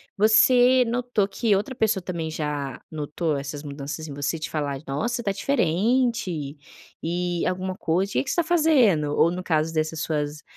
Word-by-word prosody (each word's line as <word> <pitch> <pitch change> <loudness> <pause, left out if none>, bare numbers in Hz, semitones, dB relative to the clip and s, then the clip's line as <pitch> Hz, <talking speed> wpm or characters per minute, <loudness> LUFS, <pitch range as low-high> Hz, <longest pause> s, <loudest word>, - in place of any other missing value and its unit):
você 245 +4 +5
notou 240 -4 0
que 215 -1 +1
outra 210 +7 -2
pessoa 220 -6 0
também 170 -3 -4
já 150 -4 -4
notou 155 +1 -2
essas 145 +1 -5
mudanças 145 +2 -6
em 145 - -7
você, 145 +2 -2
de 155 0 -4
falar: 145 -3 -2
"Nossa, 235 - -2
tá 200 - 0
diferente!" 200 - 0 0.5
E 175 +1 -2
alguma 185 0 -2
coisa 185 +5 -1
"O - - -7
que - - +1
que 265 - -6
você - - -1
tá 345 - +2
fazendo?". 265 - +3
Ou 170 - +4
no 180 +1 -4
caso 160 -1 0
dessas 155 0 -1
suas, 150 -1 -3
175 Hz, 175 wpm, -24 LUFS, 150-225 Hz, 0.5 s, você